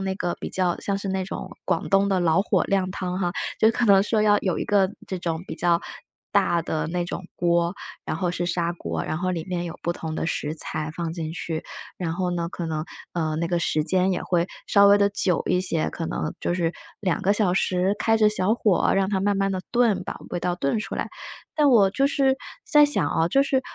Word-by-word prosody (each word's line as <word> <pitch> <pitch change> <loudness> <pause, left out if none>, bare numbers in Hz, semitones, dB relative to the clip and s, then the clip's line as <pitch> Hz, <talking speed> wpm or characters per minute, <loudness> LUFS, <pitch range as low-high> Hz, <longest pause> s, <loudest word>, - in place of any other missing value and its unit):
那 195 0 -1
个 175 -2 -2
比 - - -5
较 180 -2 0
像 200 -1 -1
是 200 - -6
那 190 0 -1
种 185 - -6 0.2
广 - - -1
东 195 0 +3
的 195 -2 +2
老 170 +1 +3
火 - - +1
靓 190 -2 0
汤 180 -1 -3
哈。 175 - +1 0.3
就 220 - +6
可 235 +1 0
能 195 -2 +6
说 215 +1 +1
要 210 -1 +5
有 185 -3 -1
一 - - -2
个 195 -2 +2 0.2
这 190 - -4
种 165 0 -3
比 - - -5
较 170 -1 +2 0.5
大 170 - +3
的 160 -1 -2
那 175 +1 -1
种 175 +1 -5
锅， 170 0 +1 0.3
然 - - -3
后 180 -2 -1
是 175 0 -2
砂 175 -1 0
锅， - - -4
然 155 - -2
后 185 +1 -1
里 170 -3 -3
面 180 -2 -2
有 170 -1 -6
不 170 - 0
同 160 -2 -5
的 165 - -2
食 150 -2 -2
材 155 0 -3
放 165 -1 -3
进 160 -2 -4
去。 165 -2 -4 0.3
然 170 -3 -3
后 180 +1 -1
呢， 170 -1 -2
可 175 - -6
能， 155 -1 -2 0.3
呃， 160 -3 -1
那 165 +1 -1
个 175 - +1
时 155 -2 +1
间 185 +4 +2
也 - - -2
会 175 -1 +1 0.2
稍 200 -1 +6
微 200 0 +7
地 200 - +4
久 190 -3 +1
一 180 - +2
些， 170 -4 +1
可 165 - -4
能 155 - -3
就 175 - -1
是 170 -2 0 0.3
2 185 -5 0
个 200 - +3
小 205 -4 +1
时 185 +1 +1
开 225 0 +3
着 215 -1 +5
小 210 0 +1
火， 210 -5 +2
让 195 -1 +2
它 195 -2 0
慢 205 0 +1
慢 195 0 +1
地 190 -1 -2
炖， 235 -5 +2
把 - - -5
味 - - -2
道 175 0 -1
炖 155 +2 0
出 215 - -4
来。 - - -3 0.5
但 295 -1 +4
我 200 -5 +5
就 275 +7 +2
是 270 -1 +2 0.3
在 295 -1 +6
想 290 - +2
啊， 165 0 +1
就 275 +10 +3
是 275 -1 +1
180 Hz, 255 characters per minute, -24 LUFS, 170-200 Hz, 0.5 s, 微